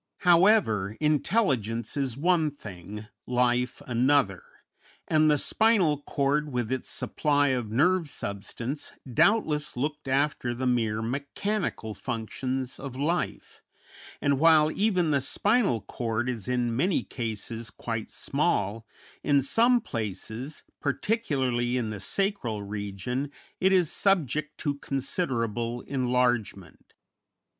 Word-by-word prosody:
However, 170 - +4
intelligence 140 - +1
is 135 -4 -1
one 165 0 +3
thing, 105 -5 -9 0.2
life 125 0 +1
another, 125 -5 +2 0.7
and 155 -1 +4
the 150 - +4
spinal 185 -5 +3
cord, 145 +1 0
with 120 -2 -2
its 130 - -2
supply 145 -1 +1
of 125 -4 -1
nerve 165 +8 +2
substance, 115 +6 -5 0.2
doubtless 150 - +2
looked 150 +2 -3
after 135 -3 0
the 130 +2 -3
mere 115 -3 +1
mechanical 140 - -2
functions 130 +3 -4
of 135 -2 -7
life; 160 +6 -2 0.6
and 140 -1 +1
while 155 -1 +6
even 185 -6 +1
the 140 -2 +2
spinal 205 - +2
cord 115 0 -2
is 115 -4 -4
in 120 -2 0
many 175 +8 +1
cases 115 -1 -5
quite 115 +1 -5
small, 105 +3 -1 0.4
in 140 -2 +3
some 240 - +4
places, 115 - -5 0.2
particularly 130 - 0
in 115 -3 -2
the 105 - -5
sacral 160 - -2
region, 105 +7 -4 0.3
it 190 +1 +3
is 180 -4 +3
subject 155 - +1
to 145 -2 -2
considerable 120 - -2
enlargement. 125 - -1
130 Hz, 115 wpm, -27 LUFS, 115-155 Hz, 0.7 s, while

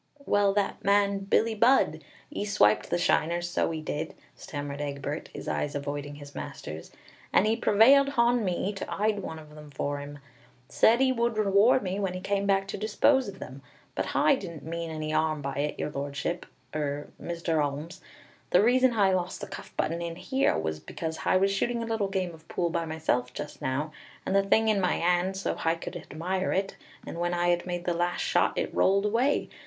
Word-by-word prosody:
"Well, 205 -1 +3
that 205 -1 -1
man 200 0 +3
Billie 225 +3 +2
Budd, 235 +5 +3 0.3
'e 205 - -3
swiped 110 - +3
the - - +1
shiners, 175 0 +1
so 175 - 0
'e 160 -1 -4
did," 150 0 -4 0.2
stammered 145 -1 -6
Egbert, 145 +1 -4
his - - -8
eyes 145 0 -2
avoiding 145 0 -4
his 145 -1 -11
master's, 80 +1 -7 0.4
"and - - +4
'e 220 +1 +2
prevailed 245 +6 +5
hon 235 0 +4
me 190 +2 -1
to 195 - -6
'ide 210 0 0
one 160 -4 -6
of 155 -1 -13
them 150 -1 -12
for 145 +1 -3
'im. 145 0 -8 0.5
Said 225 - +4
'e 260 - +3
would 235 -2 0
reward 210 +5 +4
me 190 +1 -2
when 190 -2 -1
'e - - -3
came 200 +1 -1
back 195 0 +2
to - - -4
dispose 240 +5 +3
of 195 -1 -7
them. 135 -4 -9 0.3
But - - -2
Hi - - +3
didn't 170 - -5
mean 165 +1 -4
any 155 -1 -4
'arm 155 -1 +1
by 140 0 -3
it, 145 +1 -1
Your 150 - -3
Lordship, 140 +4 -3 0.3
er, 145 -1 -3
Mr. 170 -2 -1
'Olmes. 145 +4 -5 0.5
The 180 - +5
reason 255 +2 +4
Hi 200 -4 +3
lost 180 -1 -2
the - - -5
cuff - - -9
button 165 +2 -1
in 170 -1 -4 0.2
'ere 270 +1 +3
was 80 0 -2
because 160 - -5
Hi 185 - +2
was 195 +1 +3
shooting 235 +4 0
a - - -3
little 225 -3 -1
game 185 -3 -2
of 160 0 -16
pool 170 -1 -1
by 170 0 -1
myself 135 -6 -1
just 150 - -7
now, 140 +4 -2 0.3
with - - -1
the 195 - +5
thing 220 +3 +3
in 210 -3 +3
my 180 - +2
'and, 180 +2 +1
so 195 - -1
Hi 165 0 0
could 165 - -7
hadmire 185 +5 -3
it, 195 0 -2 0.3
and 170 - -6
when 175 0 0
Hi 175 0 +3
made 175 0 -3
the 175 - +1
last 175 +1 -1
shot, - - +1
it - - -2
rolled 195 +2 +3
away. 240 +7 +1
175 Hz, 205 wpm, -28 LUFS, 155-205 Hz, 0.5 s, prevailed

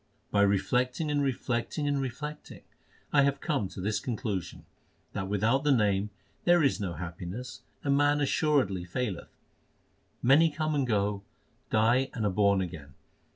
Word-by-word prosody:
By 100 - +3
reflecting 125 - +1
and 145 -1 +1
reflecting 130 +1 -1
and 140 -1 +1
reflecting 150 +4 -6 0.5
I 145 - +6
have 140 0 +2
come 140 - -1
to 95 - -10
this 105 +3 -1
conclusion, 105 -7 -4 0.5
That 95 - -3
without 110 +7 +1
the 150 - +3
Name 105 -5 +2 0.3
there 175 -2 +5
is 140 - +2
no 95 -4 -3
happiness 90 +8 -7 0.2
and 140 -1 +2
man 145 +1 +3
assuredly 140 - +1
faileth. 95 +1 -4 0.9
Many 145 +6 +6
come 155 0 -2
and 140 -3 0
go, 100 -2 0 0.5
die 120 +5 +3
and 110 -3 -1
are 100 - +2
born 100 0 +3
again. 75 -6 -7
120 Hz, 150 wpm, -29 LUFS, 100-140 Hz, 0.9 s, I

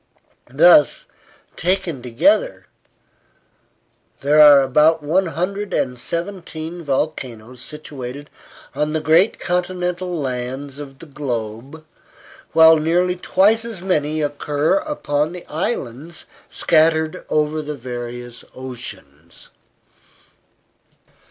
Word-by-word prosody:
Thus, 150 +3 +5 0.5
taken 180 -3 0
altogether, 145 - +1 1.6
there 145 +2 +3
are 145 -2 +9
about 150 +4 +3
one 180 +5 +1
hundred 195 +5 -3
and 125 -2 -1
seventeen 170 0 -4
volcanoes 130 -5 -3
situated 145 -1 -7 0.4
on 150 +1 -1
the 160 - 0
great 165 +7 +3
continental 180 0 -2
lands 130 +1 -4
of 135 -2 -9
the 165 - -12
globe, 135 +1 -5 0.7
while 160 0 +7
nearly 175 +4 +1
twice 205 +5 +2
as 225 -6 -7
many 155 -4 0
occur 145 - 0
upon 165 - -2
the 180 - -9
islands 155 - -4 0.2
scattered 160 0 +2
over 155 +1 0
the 150 0 -5
various 120 -1 -7
oceans. 95 - -8
150 Hz, 95 wpm, -20 LUFS, 130-175 Hz, 1.6 s, are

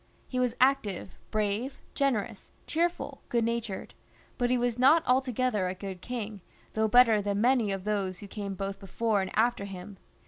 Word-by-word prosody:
He 255 - -2
was 250 -1 +1
active, 250 -9 +2 0.2
brave, 215 +5 -1 0.2
generous, 225 -7 -1 0.2
cheerful, 340 +2 -1
good 235 -1 +2
natured; 230 -4 -3 0.5
but 245 0 +2
he 250 - +3
was 245 -1 0
not 310 +6 +6
altogether 250 -5 +1
a 185 - -3
good 190 -2 -7
king, 220 -4 -5 0.3
though 220 0 +2
better 225 -2 +6
than 200 0 -1
many 240 -2 +3
of 195 -1 -3
those 195 -3 -1
who 205 - -10
came 200 -1 -5
both 195 +1 -4
before 205 +2 0
and 190 - -3
after 225 -2 +2
him. 195 +1 -8
220 Hz, 170 wpm, -29 LUFS, 200-250 Hz, 0.5 s, not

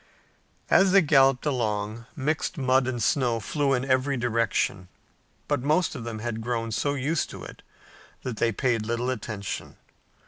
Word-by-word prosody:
As 190 -1 +5
they 195 -2 +7
galloped 135 -3 +4
along, 110 -4 -2
mixed 155 +4 -1
mud 130 -1 +2
and 120 -3 -2
snow 120 -3 +2
flew 140 +5 0
in 125 +1 -2
every 135 +1 +1
direction, 115 -5 0 0.6
but 145 -3 0
most 155 +6 +1
of 125 -6 -7
them 115 -2 -4
had 110 0 -4
grown 115 -1 -2
so 145 +6 0
used 145 +4 -1
to - - -9
it - - -11 0.6
that 125 -4 -4
they 115 - +2
paid 115 -1 0
little 120 +3 -1
attention. 105 -4 -5
125 Hz, 160 wpm, -26 LUFS, 115-140 Hz, 0.6 s, they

